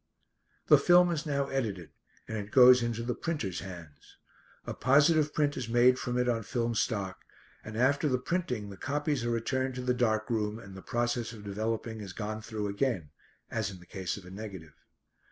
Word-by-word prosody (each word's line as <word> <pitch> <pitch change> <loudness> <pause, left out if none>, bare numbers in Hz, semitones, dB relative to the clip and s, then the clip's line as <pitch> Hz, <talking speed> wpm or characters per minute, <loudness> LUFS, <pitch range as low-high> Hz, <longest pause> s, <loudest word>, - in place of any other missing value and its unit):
The - - +7
film 175 0 +5
is 160 -1 -2
now 140 -1 0
edited, 105 -11 -3 0.4
and 110 - -4
it 105 -1 -4
goes 125 +1 +8
into 115 -1 -2
the 120 +1 -1
printer's 110 - -3
hands. 85 -6 -11 0.5
A - - -4
positive 150 +3 +4
print 145 -1 +1
is 120 -3 -4
made 125 +2 +5
from 125 0 -2
it 125 0 +1
on 115 -2 +1
film 120 +1 -1
stock, 100 -4 -1 0.4
and 110 0 -7
after 140 +5 +3
the 130 - +2
printing 125 - -2
the 100 - -10
copies 145 +1 -1
are 120 - -1
returned 130 +3 -1
to 125 - -4
the 125 0 +2
dark 110 -3 +1
room 105 -1 0
and 100 -4 -11
the 95 - -9
process 120 +1 -1
of 105 -3 -11
developing 110 +2 -3
is 95 -2 -7
gone 110 +1 -4
through 110 -1 -4
again, 100 - -1 0.4
as 110 -3 -1
in 95 -2 -9
the 90 - -15
case 95 0 -4
of 100 - -11
a 90 - -11
negative. 95 -6 -8
115 Hz, 195 wpm, -30 LUFS, 105-130 Hz, 0.5 s, goes